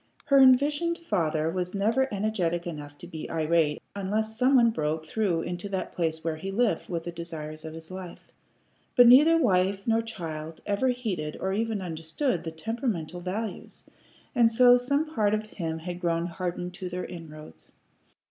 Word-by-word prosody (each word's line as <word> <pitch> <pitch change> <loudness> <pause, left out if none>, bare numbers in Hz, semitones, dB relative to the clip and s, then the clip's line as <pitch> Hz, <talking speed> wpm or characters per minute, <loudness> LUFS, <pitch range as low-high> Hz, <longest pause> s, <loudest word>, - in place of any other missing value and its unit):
Her 275 -1 +5
envisioned 290 +6 +4
father 160 - 0
was 180 +2 -3
never 230 +7 +1
energetic 195 -5 -1
enough 145 -4 -7
to - - -9
be 160 -3 -7
irritable 160 -1 +1
unless 215 +3 -1
some 255 +4 +3
one 235 -2 +6
broke 155 -4 -2
through 175 -1 0
into 175 +3 -5
that 190 -1 -3
place 160 -2 -2
where 160 -1 -2
he 190 +5 -5
lived 230 +3 0
with 170 -2 -3
the 175 - -5
desires 160 -2 -7
of 160 0 -7
his 160 +1 -10
life. 185 -2 -9 0.6
But 245 - +8
neither 295 +7 +8
wife 195 - +2
nor 225 0 +2
child 165 -8 -6
ever 205 +5 +1
heeded 215 -12 -2
or 190 0 -1
even 220 -1 -1
understood 165 - -2
the 165 - -4
temperamental 180 - -3
values, 195 +2 -5 0.5
and 235 -4 +4
so 245 +1 +7
some 280 +5 +1
part 210 -4 +2
of 215 0 -3
him 165 -6 -4
had 175 +2 -6
grown 170 -1 0
hardened 175 +1 -4
to 180 0 -6
their 180 +1 -4
inroads. 155 -3 -11
185 Hz, 170 wpm, -27 LUFS, 165-225 Hz, 0.6 s, But